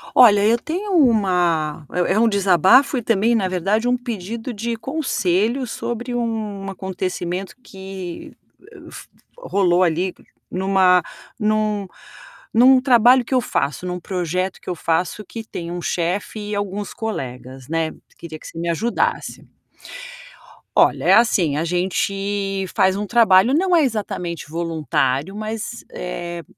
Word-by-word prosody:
Olha, 205 -4 +7
eu 230 +2 +4
tenho 370 - -4
uma 180 - +2
é 180 +1 +1
é 215 - +2
um 230 - +4
desabafo 200 - +4
e - - -1
também, 230 +1 +2
na 200 -4 +1
verdade, 195 +6 0
um 250 0 +2
pedido 230 0 -5
de 230 +2 -3
conselho 235 - -1
sobre 240 +1 -4
um 215 -4 -3
acontecimento 185 0 -4
que, 190 -4 -9 0.5
f - - -11 0.3
rolou 185 - +2
ali 180 +2 0 0.4
numa 185 -1 +3 0.4
num 210 -2 0 0.7
num 255 +3 +6
trabalho 250 -1 +5
que 265 - -5
eu 255 - +3
faço, 150 -6 -2
em - - -3
um 180 0 -4
projeto 180 +1 -3
que - - -8
eu 180 - -2
faço 170 +6 -1
que 225 -1 -8
tem 170 -5 -6
um 175 0 -4
chefe 180 +6 -2
e - - -1
alguns 205 0 -4
colegas, 130 - -6
né. 165 -1 -1 0.3
Queria 160 -2 -9
que - - -11
você - - -11
me 170 - -2
ajudasse. 225 +9 -2 1.3
Olha, - - +3
é - - +6
assim, 180 -11 +3
a 160 - -1
gente 195 +2 -1
faz 190 0 +3
um 205 - -3
trabalho, 225 0 +5
não 360 +4 +3
é 325 - +5
exatamente 180 - -3
voluntário, 155 -1 -1
mas, 220 +2 -5
eh, 175 -1 -6
195 Hz, 140 wpm, -21 LUFS, 175-230 Hz, 1.3 s, Olha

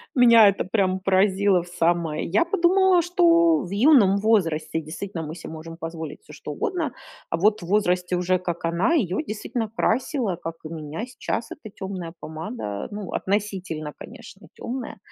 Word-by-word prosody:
Меня 235 -4 +7
это 200 - +1
прям 190 -1 0
поразило 190 -1 +3
в - - -14
самое. 170 -3 0
Я 205 - +2
подумала, 370 +1 +4
что 335 -1 +4
в 180 - -8
юном 210 -3 +5
возрасте 185 -7 +1
действительно 165 +2 -6
мы 155 +1 -6
се 170 - -9
можем 160 +1 -8
позволить 165 - -7
всё - - -15
что - - -8
угодно, 340 -7 -2 0.4
а 165 - 0
вот 210 +2 +2
в - - -6
возрасте 180 -2 +1
уже, 180 +1 +1
как 175 -2 -5
она, 170 - +1
ее 225 - 0
действительно 220 0 -4
красило, 240 - 0
как 165 0 -6
и 155 - -5
меня 160 +6 -5
сейчас, 240 -2 -4
эта 215 -8 -10
тёмная 185 -4 -6
помада. 160 - -6
Ну, 205 -3 -6
относительно 190 -6 -2
конечно - - -12
тёмная. 245 -3 -6
195 Hz, 165 wpm, -24 LUFS, 170-235 Hz, 0.4 s, Меня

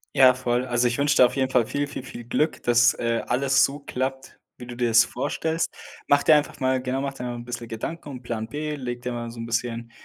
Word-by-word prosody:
Ja, 130 -2 +7
voll. 125 -1 -1
Also 120 -1 +1
ich 120 - -1
wünsche 145 0 +2
dir 125 - +8
auf - - -8
jeden 130 -1 0
Fall 120 -3 +3
viel, 145 0 -1
viel, 145 - -7
viel 120 -2 -9
Glück, 150 +6 -1
dass, 120 0 +4
äh, 115 -1 -1
alles 135 +2 +3
so 140 +1 0
klappt, 130 -1 -4 0.2
wie 125 - -9
du 120 0 -8
dir 120 0 0
das 115 +1 +6
vorstellst. 160 +5 -2 0.4
Mach 145 0 +4
dir 160 - +6
einfach 150 0 0
mal 130 -1 +1
genau, 130 +1 -2
mach 140 0 -3
dir 125 - -8
mal 120 -1 -4
'n 120 0 -8
bisschen 120 -1 -6
Gedanken 145 +8 -6
und 125 -2 -8
Plan 110 -2 -4
b, 150 +2 -3
leg 125 -3 -5
dir 125 - -3
mal 120 -1 -4
so 115 0 -10
'n 115 - -4
bisschen 115 0 -3
125 Hz, 255 wpm, -24 LUFS, 120-135 Hz, 0.4 s, dir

